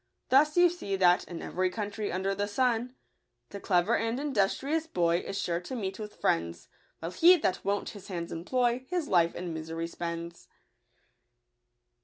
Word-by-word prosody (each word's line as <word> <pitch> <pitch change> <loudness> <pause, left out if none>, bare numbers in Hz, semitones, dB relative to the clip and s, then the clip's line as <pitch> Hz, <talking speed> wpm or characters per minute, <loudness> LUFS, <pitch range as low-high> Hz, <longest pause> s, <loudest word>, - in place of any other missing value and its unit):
Thus 300 +5 +4
you 355 0 +7
see 335 - -3
that, 180 -2 +4
in 170 -2 -7
every 185 +1 0
country 205 +1 -4
under 190 +2 -1
the 205 +1 -2
sun, 245 +2 0 0.3
— - - -51
The 200 - -6
clever 180 -3 +2
and 230 +3 -1
industrious 285 +4 0
boy 170 - +2
Is 195 +2 -4
sure 170 -3 -1
to 180 +9 -7
meet 195 -4 -4
with 210 -1 -9
Mends; 85 0 0 0.3
While 165 +2 -5
he 350 - +6
that 190 - -1
won't 200 0 -1
his 200 -2 -11
hands 170 -4 -5
employ 245 +8 0
His 350 -4 -1
life 170 -2 +3
in 175 -2 -4
misery 160 +1 -4
spends. 170 0 -6
195 Hz, 170 wpm, -29 LUFS, 175-250 Hz, 0.3 s, you